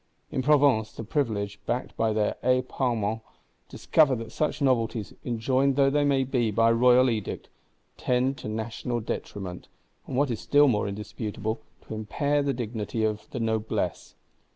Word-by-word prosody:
In 130 - -1
Provence, 135 -6 +3
the - - -7
Privileged, 105 -6 -2
backed 125 - -2
by 110 -1 +1
their 105 -1 0
Aix 125 0 +2
Parlement, 115 -4 -1 0.5
discover 150 -5 +3
that 115 -1 -7
such 155 - -1
novelties, 115 -6 0
enjoined 130 +3 +1
though 135 0 +4
they 140 -2 +2
be 125 -3 0
by 115 +2 +3
Royal 125 +2 +5
Edict, 110 -4 -3 0.5
tend 125 +2 +1
to - - -7
National 110 +2 -3
detriment; 95 -4 -5 0.4
and 125 - -3
what 140 -1 +2
is 115 - -3
still 145 0 +4
more 105 -5 +1
indisputable, 105 +2 -4 0.3
"to - - -6
impair 140 +7 0
the 140 -1 0
dignity 115 -3 -3
of 105 -1 -2
the 125 - -5
Noblesse." 110 -5 -2
115 Hz, 155 wpm, -27 LUFS, 110-130 Hz, 0.5 s, Royal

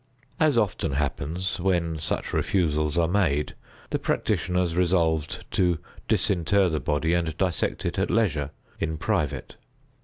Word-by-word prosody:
As 155 -6 +4
often 95 -9 +1
happens, 75 +6 -2
when 85 -3 0
such 80 - -2
refusals 75 -4 +1
are 85 -1 +3
made, 80 -6 +1 0.4
the - - 0
practitioners 90 -1 0
resolved 85 -4 +1
to 90 -3 +2 0.3
disinter 95 +1 +2
the 80 -2 -1
body 75 +5 0
and 80 -3 0
dissect 90 -3 -1
it - - -1
at - - +1
leisure, 80 -11 +1 0.3
in 80 -1 -1
private. 85 -4 -2
85 Hz, 130 wpm, -26 LUFS, 75-95 Hz, 0.4 s, As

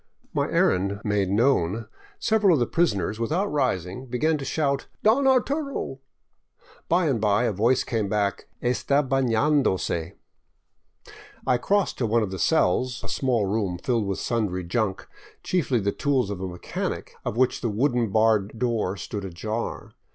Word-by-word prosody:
My - - 0
errand 100 +2 +1
made 105 -3 0
known, 110 -2 +2 0.3
several 215 -5 +3
of - - 0
the 120 - +2
prisoners, 105 - 0
without 170 - 0
rising, 125 - -1
began 140 +6 +1
to 135 - -5
shout, 140 -1 -1
" - - -40
Don 250 +6 +4
Arturo! 275 - 0 0.5
" - - -29
By 175 +1 +3
and 130 -8 +1
by 105 +2 +3
a 120 - +1
voice 115 +6 +2
came 110 -5 -2
back, 100 -1 -1
" - - -24
'Sta 140 +4 +2
baiiandose! 130 - +1 0.6
" - - -21
I 125 - +3
crossed 200 +8 0
to 120 - +1
one 115 +1 +2
of 100 - -4
the 95 - -5
cells, 125 - +1
a - - -6
small 125 -6 0
room 100 -3 -1
filled 115 +2 -1
with 95 - -2
sundry 105 -6 -1
junk, 95 +2 -2 0.4
chiefly 140 -9 +1
the 100 -1 0
tools 130 -6 0
of 95 -2 -5
a 95 - -2
mechanic, 90 -1 -5
of 110 - -3
which 130 0 +2
the 115 - 0
wooden 120 +1 +1
barred 110 0 +2
door 110 -5 -1
stood 100 +2 -5
ajar. 105 +5 -4
115 Hz, 165 wpm, -25 LUFS, 100-140 Hz, 0.6 s, Don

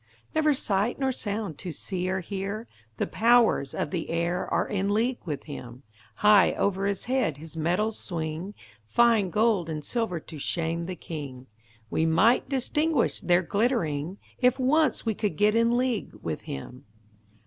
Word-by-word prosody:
Never 305 -2 +3
sight 205 -1 0
nor 270 -1 +1
sound 205 - -4
to 180 - -5
see 180 +4 -3
or 190 0 -1
hear; 200 +4 -4 0.3
The - - 0
powers 230 - +3
of 150 - -2
the 170 - -3
air 170 +2 -1
are - - +1
in 200 -1 -1
league 235 +4 +1
with 150 -5 -4
him; 130 -3 -9 0.3
High 210 - +5
over 195 0 0
his 200 -2 -2
head 250 - 0
his 160 +2 -9
metals 180 +7 0
swing, 170 +3 -4 0.3
Fine 230 - +4
gold 210 -3 +2
and 155 -2 -4
silver 225 -8 -1
to 155 -1 -10
shame 170 +2 -2
the 185 - -4
king; 140 -7 -7 0.5
We 160 - +1
might 195 +10 +3
distinguish 290 +1 +1
their 175 +1 +3
glittering, 175 - 0 0.2
If 255 0 +3
once 300 +4 +2
we 225 - +1
could 205 -5 -2
get 210 0 +4
in 230 +1 +3
league 245 - -1
with 85 -7 -5
him. 125 - -7
195 Hz, 160 wpm, -27 LUFS, 160-230 Hz, 0.5 s, High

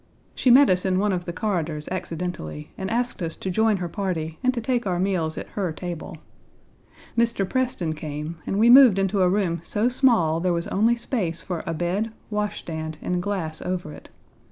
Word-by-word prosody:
She 255 - +1
met 265 +3 +8
us 180 0 +2
in 185 -1 +1
one 205 +2 +2
of 175 -1 -3
the 170 - -3
corridors 170 -6 -2
accidentally, 170 - -5
and 190 0 -4
asked 240 -2 -1
us 165 -1 -2
to 190 - -4
join 220 +2 +3
her 180 -1 -3
party 165 -4 -3
and 255 - +4
to 250 - -3
take 240 -1 -1
our 180 -2 0
meals 180 -4 0
at - - -6
her 190 -5 -2
table. 170 +1 -6 1.0
Mr. 230 -4 +1
Preston 245 -10 -1
came, 150 +1 -6
and 195 - -1
we 220 +3 +5
moved 245 -4 +8
into 195 0 +1
a 180 - +4
room 180 -3 0
so 210 +7 0
small 230 - +3
there 180 +1 +1
was 170 0 -1
only 225 +4 +3
space 215 -9 -3
for 175 -3 -4
a 165 - -1
bed, 185 +7 -1 0.2
wash 210 0 -1
stand, 160 -1 -5
and 180 0 -1
glass 175 -5 -3
over 180 -4 -3
it. - - -13
185 Hz, 200 wpm, -24 LUFS, 165-215 Hz, 1.0 s, met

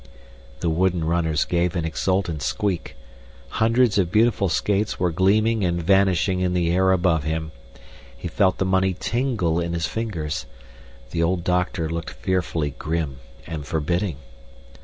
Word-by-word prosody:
The 85 - +1
wooden 90 0 +1
runners 80 -1 +1
gave 85 0 0
an 85 -2 -1
exultant 85 -1 -1
squeak. 95 +3 -2 0.7
Hundreds 115 -1 +3
of 90 -2 +1
beautiful 110 -2 +3
skates 100 +5 0
were 90 -2 +1
gleaming 105 +5 +2
and 85 -1 0
vanishing 95 0 +2
in 90 -1 0
the 85 -1 +1
air 95 +2 +3
above 85 -4 +2
him. 80 +1 -3 0.7
He 70 - -5
felt 95 +3 +2
the 95 - 0
money 95 0 +2
tingle 115 -10 0
in 85 0 -2
his 85 -1 -1
fingers. 90 -10 -3 0.6
The 85 - -1
old 85 +1 +1
doctor 90 -1 0
looked 80 -1 -4
fearfully 80 +3 -1
grim 80 -4 -2 0.3
and 80 -3 -5
forbidding. 85 +3 -1
90 Hz, 145 wpm, -23 LUFS, 80-95 Hz, 0.7 s, Hundreds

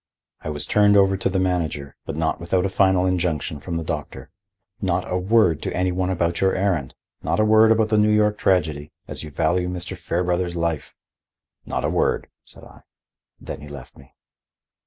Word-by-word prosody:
I - - -5
was 75 -1 -1
turned 105 -1 +4
over 95 -1 +4
to 95 - -1
the 95 - -1
manager, 85 -7 -1
but 80 - -4
not 80 0 -1
without 90 +2 0
a - - 0
final 95 -1 +3
injunction 85 -5 -1
from 85 +3 -4
the 85 - -3
doctor. 65 -3 -6 0.5
"Not 90 -2 -1
a - - -2
word 90 -4 +3
to - - -4
any 90 +1 +1
one 90 +1 -1
about 85 -2 -1
your 95 0 +2
errand! 90 -9 -1 0.3
Not - - -1
a 110 - +4
word 110 +1 +6
about 110 -1 +3
the 110 -1 +3
New 105 0 +4
York 105 0 +2
tragedy, 75 -6 0 0.2
as - - -7
you 75 - -7
value 90 +4 0
Mr. 90 +1 -5
Fairbrother's 90 0 -1
life." 85 -2 -2 0.7
"Not - - -2
a - - +1
word," - - 0
said - - -13
I. - - -15 0.6
Then - - -8
he 75 - -10
left 70 -3 -11
me. 65 - -19
90 Hz, 195 wpm, -22 LUFS, 80-95 Hz, 0.7 s, word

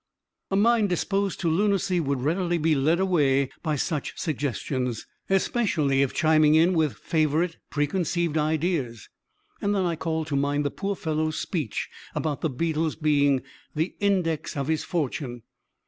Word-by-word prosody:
A 195 - 0
mind 220 0 +3
disposed 195 +2 -1
to 175 - 0
lunacy 190 +1 +2
would 140 -5 -1
readily 175 +3 +1
be 160 0 +2
led 155 +5 +2
away 140 -8 +2
by 155 -3 -1
such 150 +1 -2
suggestions 130 - -2 0.2
especially 180 - +2
if 140 - +1
chiming 155 -1 +4
in 165 +3 +5
with 160 -4 +1
favorite 160 +2 0
preconceived 165 +2 0
ideas 155 - -1 0.5
and 205 0 +1
then 190 -2 +1
I 170 -1 0
called 160 0 -2
to 145 - -1
mind 145 +1 +1
the 145 - 0
poor 200 0 -3
fellow's 155 -2 -1
speech 150 - -3 0.3
about 150 -3 -2
the 160 - 0
beetle's 160 +3 -1
being 145 -3 +2 0.3
"the 160 +4 -1
index 180 -8 0
of 140 +1 -2
his 160 -1 0
fortune." 135 - -3
160 Hz, 150 wpm, -26 LUFS, 145-175 Hz, 0.5 s, in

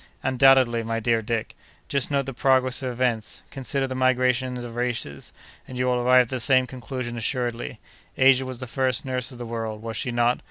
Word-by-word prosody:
"Undoubtedly, 130 -2 +4
my 115 0 -2
dear 115 0 +1
Dick. 110 0 -3 0.3
Just 140 -2 -1
note 140 -2 0
the 135 - -5
progress 130 +1 +3
of 130 - -2
events: 120 -3 -2
consider 135 0 -2
the 130 - -4
migrations 130 -1 +1
of 115 -1 -8
races, 120 - -3 0.4
and 130 - -8
you 125 - 0
will 125 -1 +1
arrive 125 +1 +5
at 120 - -12
the 130 - -3
same 130 +2 +4
conclusion 125 -1 -6
assuredly. 120 0 -3 0.4
Asia 135 0 +5
was 130 -2 -6
the 130 - -5
first 130 +1 0
nurse 130 0 -3
of 125 - -11
the 120 - -6
world, 115 -2 -5
was 115 -1 -5
she 125 - -1
not? 120 0 +1
125 Hz, 200 wpm, -24 LUFS, 120-130 Hz, 0.4 s, arrive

